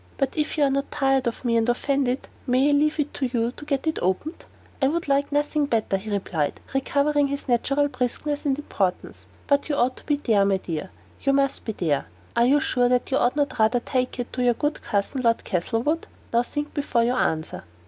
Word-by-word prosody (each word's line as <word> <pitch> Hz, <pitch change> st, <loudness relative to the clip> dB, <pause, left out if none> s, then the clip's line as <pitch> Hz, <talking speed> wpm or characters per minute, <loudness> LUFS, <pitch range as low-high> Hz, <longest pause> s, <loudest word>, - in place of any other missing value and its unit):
But 275 Hz, -2 st, -1 dB
if 305 Hz, 0 st, -1 dB
you 295 Hz, -, +3 dB
are 275 Hz, -, +3 dB
not 275 Hz, +1 st, -1 dB
tired 270 Hz, -3 st, +1 dB
of 235 Hz, +2 st, -4 dB
me 235 Hz, -1 st, +2 dB
and 225 Hz, +1 st, +2 dB
offended, 265 Hz, +1 st, 0 dB, 0.2 s
may 260 Hz, +3 st, +3 dB
I -, -, +3 dB
leave 300 Hz, +2 st, +2 dB
it 295 Hz, 0 st, -1 dB
to 265 Hz, -, -1 dB
you 235 Hz, -1 st, 0 dB
to 295 Hz, -, -11 dB
get 280 Hz, -1 st, -1 dB
it 315 Hz, -, 0 dB
opened?" 190 Hz, -, -2 dB, 0.4 s
"I 270 Hz, -, +4 dB
would 330 Hz, +3 st, -1 dB
like 280 Hz, +1 st, +1 dB
nothing 290 Hz, 0 st, +1 dB
better," 220 Hz, -6 st, 0 dB
he 205 Hz, +3 st, -8 dB
replied, 185 Hz, -7 st, -1 dB
recovering 285 Hz, +2 st, +2 dB
his 280 Hz, +1 st, -4 dB
natural 275 Hz, +4 st, +2 dB
briskness 280 Hz, +3 st, -2 dB
and 275 Hz, -2 st, +1 dB
importance; 195 Hz, -11 st, -3 dB, 0.2 s
"but 280 Hz, +1 st, +1 dB
you 290 Hz, -, +1 dB
ought 255 Hz, -1 st, +1 dB
to -, -, -12 dB
be 295 Hz, -, +3 dB
there, 225 Hz, -8 st, +2 dB
my 195 Hz, -1 st, +2 dB
dear; 175 Hz, 0 st, -5 dB, 0.3 s
you 275 Hz, -, +2 dB
must 275 Hz, 0 st, +1 dB
be 220 Hz, -, -2 dB
there. 150 Hz, -, -1 dB, 0.3 s
Are 235 Hz, +1 st, +4 dB
you 285 Hz, +3 st, +5 dB
sure 245 Hz, -3 st, +1 dB
that 250 Hz, +1 st, +1 dB
you 265 Hz, -, +3 dB
ought 245 Hz, 0 st, +2 dB
not 285 Hz, -4 st, -1 dB
rather 220 Hz, +3 st, +4 dB
to -, -, -23 dB
take 255 Hz, -2 st, -1 dB
it 245 Hz, -1 st, -5 dB
to 250 Hz, -, -2 dB
your 245 Hz, -1 st, +3 dB
good 295 Hz, +5 st, -2 dB
cousin 205 Hz, +6 st, -1 dB
Lord 230 Hz, -2 st, +2 dB
Castlewood? 230 Hz, -, -1 dB, 0.3 s
Now 235 Hz, -, +5 dB
think 295 Hz, +4 st, -4 dB
before 275 Hz, -5 st, +1 dB
you 240 Hz, +2 st, +2 dB
answer." 160 Hz, -10 st, -1 dB
265 Hz, 225 wpm, -24 LUFS, 230-285 Hz, 0.4 s, you